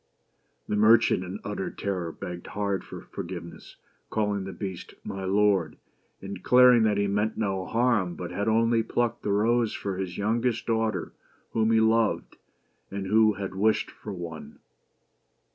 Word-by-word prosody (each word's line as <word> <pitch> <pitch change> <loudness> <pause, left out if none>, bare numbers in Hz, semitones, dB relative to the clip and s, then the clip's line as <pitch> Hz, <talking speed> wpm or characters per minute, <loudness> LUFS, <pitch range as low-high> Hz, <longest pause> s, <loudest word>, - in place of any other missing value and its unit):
The - - -1
merchant, 110 -2 +5
in 95 +3 -6
utter 100 -2 -3
terror, 90 -4 -3
begged 85 +1 -7
hard 100 -1 -2
for - - -9
forgiveness, 85 -1 -8 0.3
calling 105 -3 -1
the 95 - -5
Beast 95 -1 -7
" - - -43
my 95 -1 -5
lord," 95 -4 +2 0.5
and 100 0 -5
declaring 125 +1 +6
that 105 -2 +2
he 100 - +2
meant 105 +2 0
no 95 -4 -1
harm, 115 -7 +1
but 90 0 -6
had 100 +4 -2
only 115 +1 +3
plucked 120 +1 -1
the 100 - -2
rose 115 +2 +2
for 95 -2 -4
his 95 -2 -4
youngest 115 +3 0
daughter, 110 -5 -1 0.4
whom 110 -1 +1
he 110 - +5
loved, 110 0 +1 0.5
and 100 0 -4
who 110 +2 +4
had 95 -1 -5
wished 110 +3 +1
for 105 - -9
one. 85 -4 -8
105 Hz, 160 wpm, -27 LUFS, 95-110 Hz, 0.5 s, declaring